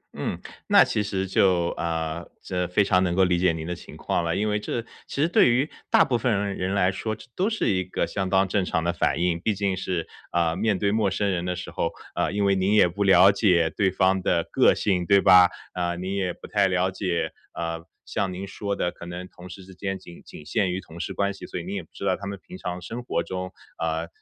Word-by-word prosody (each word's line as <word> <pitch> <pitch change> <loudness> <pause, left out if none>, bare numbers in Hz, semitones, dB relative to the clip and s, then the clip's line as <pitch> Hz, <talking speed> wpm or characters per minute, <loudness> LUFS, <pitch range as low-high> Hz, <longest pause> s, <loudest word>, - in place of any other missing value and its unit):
嗯， - - -3 0.3
那 - - +7
其 105 - -1
实 100 -2 -2
就， 90 -2 +2
呃， 80 0 -3
这 90 -1 -2
非 95 +3 +2
常 95 -1 +3
能 90 -1 0
够 95 - +4
理 90 -1 +2
解 90 -1 +3
您 80 -1 -5
的 90 - -3
情 90 - -11
况 - - -1
了。 85 0 -1
因 105 - 0
为 105 0 0
这 115 +2 -3 0.2
其 - - -6
实 160 - +3
对 170 - +5
于 130 +5 +2 0.2
大 - - +5
部 120 -4 0
分 125 -1 +1
人 100 -1 -1
人 95 +1 -2
来 95 -1 +3
说， 110 +3 -3
这 - - -14
都 195 +4 +1
是 220 - -1
一 95 -1 +1
个 90 - -2
相 95 -2 -3
当 95 0 +3
正 95 +1 +1
常 80 -2 -1
的 85 +1 0
反 85 - 0
应。 85 -1 +1
毕 105 +4 0
竟 100 -1 0
是， 90 -2 -3 0.2
呃， 85 -1 +1
面 105 0 +1
对 100 0 +1
陌 105 -2 +2
生 100 +1 0
人 85 -1 -2
的 90 0 -1
时 90 - -7
候， 85 - -1 0.2
呃， - - 0
因 100 0 0
为 100 - +4
您 95 +3 +2
也 105 - +6
不 100 +4 -2
了 95 0 +7
解 90 -6 +3
对 100 -2 +2
方 95 +1 +2
的 85 -2 +1
个 - - +5
性， 90 -4 0
对 100 0 +6
吧？ 90 -2 +7 0.2
啊， 85 -1 -1
你 95 +3 -4
也 95 -2 0
不 - - -11
太 100 -2 +2
了 95 0 +1
解， 90 -3 -2 0.2
呃， 85 0 -3 0.2
像 95 -2 -2
您 95 +2 -5
说 100 0 -3
的 90 - -1
可 85 - -11
能 90 +1 -6
同 90 0 -13
事 95 +2 -10
之 95 - -13
间 95 +1 -4
仅 90 -2 -13
仅 75 - -12
限 95 +4 0
于 90 - -2
同 85 -2 -12
事 95 - -4
关 100 0 0
系， - - -10
所 - - -5
以 - - -6
你 95 - -6
也 100 - -2
不 80 - -19
知 - - -7
道 - - +2
他 100 - -7
们 100 - -5
平 - - -9
常 90 -1 -4
生 120 +6 -5
活 105 -8 -1
中， 90 0 -5 0.3
呃， 80 0 -1
95 Hz, 280 characters per minute, -25 LUFS, 85-100 Hz, 0.3 s, 那